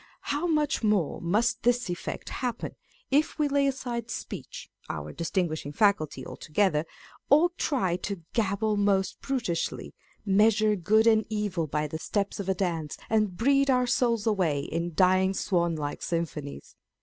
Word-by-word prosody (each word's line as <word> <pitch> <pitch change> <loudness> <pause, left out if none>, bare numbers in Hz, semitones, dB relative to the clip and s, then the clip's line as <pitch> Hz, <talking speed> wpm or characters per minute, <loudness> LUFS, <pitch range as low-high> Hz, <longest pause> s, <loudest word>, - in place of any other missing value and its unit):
How 300 +5 0
much 300 -3 +1
more 210 -8 +1
must 210 +8 +1
this 245 +1 +2
effect 175 -1 -5
happen, 245 -2 -3 0.4
if 295 +3 +2
we 300 -2 +2
lay 280 0 +2
aside 240 -4 -3
speech - - -7 0.2
(our - - -5
distinguishing 165 -3 -2
faculty) 155 -9 +1
altogether, 160 -2 0 0.4
or 315 +5 +5
try 190 - 0
to 190 -1 -5
" - - -44
gabble 210 0 0
most 200 -1 +1
brutishly," 235 -11 -2 0.3
measure 210 +1 +4
good 215 +5 +3
and 220 -1 +5
evil 205 -6 -1
by 150 +1 -1
the 155 +1 -5
steps 200 +4 -2
of 195 -1 -3
a 190 - +2
dance, 165 -5 -2
and 210 -5 +1
breathe 275 +3 +3
our 250 -1 +3
souls 235 -3 +1
away 180 -10 +1
in 165 +3 -3
dying 185 +1 +3
swan 170 -5 +1
like 145 -2 -4
symphonies 155 - -4
200 Hz, 150 wpm, -27 LUFS, 170-235 Hz, 0.4 s, or